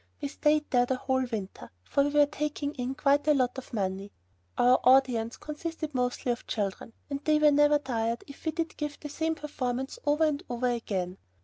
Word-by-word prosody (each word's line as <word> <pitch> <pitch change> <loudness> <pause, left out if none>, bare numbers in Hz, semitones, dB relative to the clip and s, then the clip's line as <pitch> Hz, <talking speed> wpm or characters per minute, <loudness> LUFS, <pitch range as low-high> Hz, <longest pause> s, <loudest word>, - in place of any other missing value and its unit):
We 285 - -3
stayed 300 +1 +2
there 245 -1 +3
the 260 - +1
whole 260 0 0
winter, 210 -5 -6
for 280 - +2
we 290 - +1
were 295 0 +5
taking 295 0 -3
in 255 0 -3
quite 290 0 +2
a 300 - +5
lot 255 -1 +1
of 265 - -13
money. 195 -2 -3 0.5
Our 250 +1 +5
audience 250 -3 +4
consisted 310 0 -5
mostly 250 -1 0
of 235 - -5
children, 205 +1 -3 0.2
and 280 +1 -3
they 305 -1 +3
were 300 -1 +5
never 295 +1 +5
tired 235 -4 -2
if 280 - -13
we 315 - +1
did 325 +1 -3
give 295 -1 -4
the 295 - -7
same 320 +2 -1
performance 265 -4 -4
over 295 +2 +2
and 300 -1 +1
over 245 +1 0
again. 195 -6 -3
270 Hz, 200 wpm, -29 LUFS, 245-295 Hz, 0.5 s, were